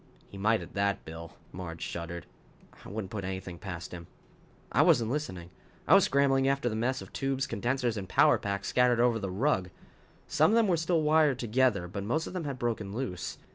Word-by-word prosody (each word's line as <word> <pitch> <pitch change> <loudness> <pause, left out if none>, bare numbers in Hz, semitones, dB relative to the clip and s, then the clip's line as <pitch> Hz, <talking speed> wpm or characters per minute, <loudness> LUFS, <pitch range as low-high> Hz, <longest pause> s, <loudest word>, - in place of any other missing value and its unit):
"He - - -11
might 110 +3 +2
at - - -12
that, 100 0 0
Bill," 80 +1 -9 0.2
Marge 85 -2 -7
shuddered. 85 0 -5 0.6
"I - - -10
wouldn't 100 -1 -5
put 105 -2 -4
anything 95 -2 -5
past 90 -4 -7
him." 85 -2 -8 0.6
I - - +4
wasn't 115 -1 +4
listening. 90 - -4 0.4
I - - +6
was - - +7
scrambling 135 -1 +3
after 135 -3 +1
the 110 - -3
mess 130 +4 -1
of - - -15
tubes, 135 -1 -1
condensers 120 -2 -1
and 95 -2 -5
power - - +5
packs 100 -1 -3
scattered 125 -1 +3
over 120 -1 +3
the 100 -2 -3
rug. 95 -2 0 0.6
Some 155 +1 +3
of 220 - +3
them 230 -2 +4
were 180 - +3
still 165 0 +1
wired 150 -3 +4
together, 120 -6 +1
but 100 +3 -5
most 155 +10 -1
of - - -7
them 180 -4 -3
had 140 -2 -4
broken 115 -5 -2
loose. 115 -9 -4
115 Hz, 205 wpm, -29 LUFS, 95-135 Hz, 0.6 s, was